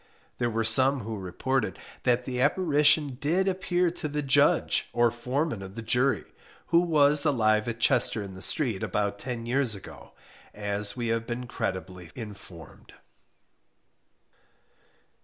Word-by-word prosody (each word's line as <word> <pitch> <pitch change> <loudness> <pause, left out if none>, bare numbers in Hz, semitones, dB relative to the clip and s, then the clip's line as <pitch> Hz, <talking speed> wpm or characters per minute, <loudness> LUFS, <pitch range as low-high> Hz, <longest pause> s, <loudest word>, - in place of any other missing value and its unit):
There 120 -1 +1
were 115 0 -1
some 130 +4 +4
who 110 +1 -5
reported 105 +7 -2 0.3
that 125 0 +2
the 125 -1 -3
apparition 150 -3 +3
did 180 +6 +1
appear 180 -2 0
to 160 - -4
the 150 0 -3
Judge, 135 -1 +2
or 120 0 +3
foreman 125 +1 -2
of 95 0 -9
the 115 - -6
jury 125 +4 +1 0.5
(who 170 - +5
was 150 -4 +4
alive 110 -7 +2
at 115 0 -4
Chester 110 -1 +2
in 95 -1 -9
the 95 - -11
Street, 115 -7 -1
about 100 -1 -2
ten 120 -2 -5
years 125 -2 +1
ago), 100 - -12 0.4
as 105 +1 -1
we 120 -2 -2
have 115 0 -1
been 125 +1 -4
credibly 95 -6 -5
informed. 100 -7 -11
120 Hz, 140 wpm, -27 LUFS, 105-145 Hz, 0.5 s, who